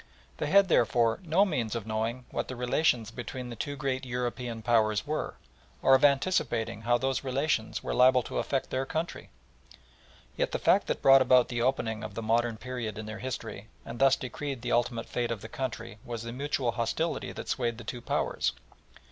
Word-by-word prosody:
They - - -2
had, 200 -1 +6
therefore, 115 - +3
no 180 +3 +3
means 120 - -1
of 115 -3 -3
knowing 110 +3 -2
what - - -2
the 130 - -5
relations 125 -2 +1
between 125 +1 -6
the - - -6
two 145 +5 -4
great 135 -1 -2
European 125 -2 -3
Powers 110 -2 +2
were, 155 +1 -3 0.5
or 135 - +6
of 135 - +5
anticipating 135 - +2
how 120 +1 +3
those 130 +1 -1
relations 130 -3 -1
were - - -2
liable 125 0 +5
to - - -3
affect 135 -2 -2
their 130 +1 0
country. 160 +4 -4 1.1
Yet - - -1
the - - +1
fact - - +3
that - - -2
brought 135 0 +8
about 125 -1 +5
the 120 -2 -2
opening 115 -4 0
of 110 - -7
the 115 - -4
modern 115 +1 +1
period 120 -3 -5
in 110 - -5
their 110 0 -7
history 115 -4 -5 0.2
and 115 - -7
thus 135 -1 +6
decreed 130 0 -5
the 120 - -2
ultimate 120 -1 +1
fate 120 -1 -2
of 115 -3 -3
the 110 - -7
country 115 -4 -5
was 115 -1 -5
the 115 - -5
mutual 135 -2 -1
hostility 120 +9 -2
that - - -7
swayed 120 -4 -1
the 120 - -9
two 120 +2 -6
Powers. 120 - 0
120 Hz, 195 wpm, -29 LUFS, 115-135 Hz, 1.1 s, brought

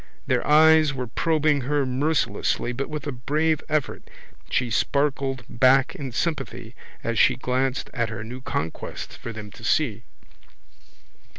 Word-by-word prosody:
Their - - 0
eyes 155 -1 +6
were 125 -1 -3
probing 155 +3 +1
her 140 +2 0
mercilessly 135 -1 0
but 135 +3 -4
with 150 -2 -5
a 145 - -2
brave 150 +5 0
effort 150 -3 -2 0.4
she 125 -2 0
sparkled 135 0 0
back 130 +2 +4
in 135 -3 -6
sympathy 125 -5 -3 0.3
as 115 -1 -1
she 125 - +5
glanced 130 +1 -1
at 115 -3 -1
her 110 0 -5
new 125 +4 -8
conquest 80 -9 -4
for 115 - -7
them 105 -2 -8
to - - -14
see. - - +1
135 Hz, 140 wpm, -24 LUFS, 120-150 Hz, 0.4 s, eyes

